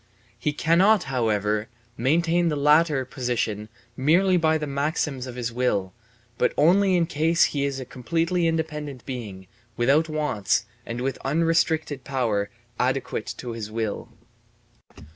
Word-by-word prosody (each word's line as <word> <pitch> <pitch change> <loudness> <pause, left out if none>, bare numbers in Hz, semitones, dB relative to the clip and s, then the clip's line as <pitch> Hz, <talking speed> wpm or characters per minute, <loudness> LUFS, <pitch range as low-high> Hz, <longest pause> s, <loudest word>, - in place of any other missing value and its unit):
He 150 - 0
cannot, 180 +7 +3
however, 105 -3 0 0.3
maintain 170 +7 +2
the 150 - -1
latter 150 -1 +3
position 120 -5 -2 0.3
merely 175 +8 +3
by 160 -2 +3
the 155 - -3
maxims 140 -2 -2
of 125 - -7
his 120 -2 -3
will, 105 -7 0 0.5
but - - +2
only 185 +4 +4
in 170 - +2
case 165 +1 +2
he 140 -1 +1
is 140 -1 -2
a 130 - -6
completely 165 +7 -1
independent 150 -5 -3
being 105 -8 -6 0.3
without 140 +7 +3
wants 135 -8 0 0.2
and 120 +1 -4
with 135 +1 -2
unrestricted 160 -1 +1
power 115 -7 -1 0.3
adequate 130 -3 -1
to 125 - -6
his 115 -2 -6
will. 110 -1 -3
140 Hz, 135 wpm, -24 LUFS, 120-160 Hz, 0.5 s, only